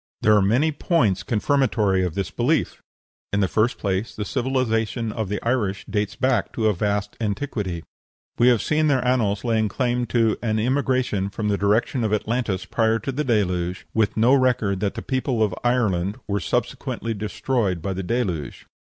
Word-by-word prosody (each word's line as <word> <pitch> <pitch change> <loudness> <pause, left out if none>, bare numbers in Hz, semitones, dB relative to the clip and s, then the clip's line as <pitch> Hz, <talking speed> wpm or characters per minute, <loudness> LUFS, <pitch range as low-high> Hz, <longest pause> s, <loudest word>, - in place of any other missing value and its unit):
There 105 - +5
are 105 - +5
many 120 +11 +2
points 145 - +1
confirmatory 110 -5 +1
of 90 -3 -2
this 100 -2 -2
belief. 140 +7 0 0.5
In 100 - +1
the 100 - +2
first 110 +6 +1
place, 100 +2 -2
the 105 - -4
civilization 115 -1 -1
of 110 -3 -3
the 105 - -2
Irish 110 -6 0
dates 105 -1 -2
back 130 -1 +1
to 110 - -1
a 110 - +4
vast 100 +2 -1
antiquity. 105 - -3 0.6
We 120 - +5
have 120 -3 +4
seen 155 0 +2
their 130 -3 +2
annals 110 -5 +1
laying 110 -3 +1
claim 120 +3 -1
to 115 -3 +1
an 110 -2 0
immigration 125 -4 0
from 105 +1 -3
the 100 - +2
direction 110 +5 +1
of 110 -1 0
Atlantis 110 -3 -2
prior 110 -1 +1
to 135 - -4
the 145 +3 -2
Deluge, 90 -7 0
with 110 -1 +1
no 120 +4 +5
record 125 -7 +2
that 100 0 -1
the - - -5
people 130 -3 0
of 105 -4 0
Ireland 105 -6 +1
were 100 -1 0
subsequently 120 0 -2
destroyed 105 -2 -1
by 95 +4 -3
the 95 - -3
Deluge. 90 - -3
110 Hz, 175 wpm, -23 LUFS, 100-125 Hz, 0.6 s, There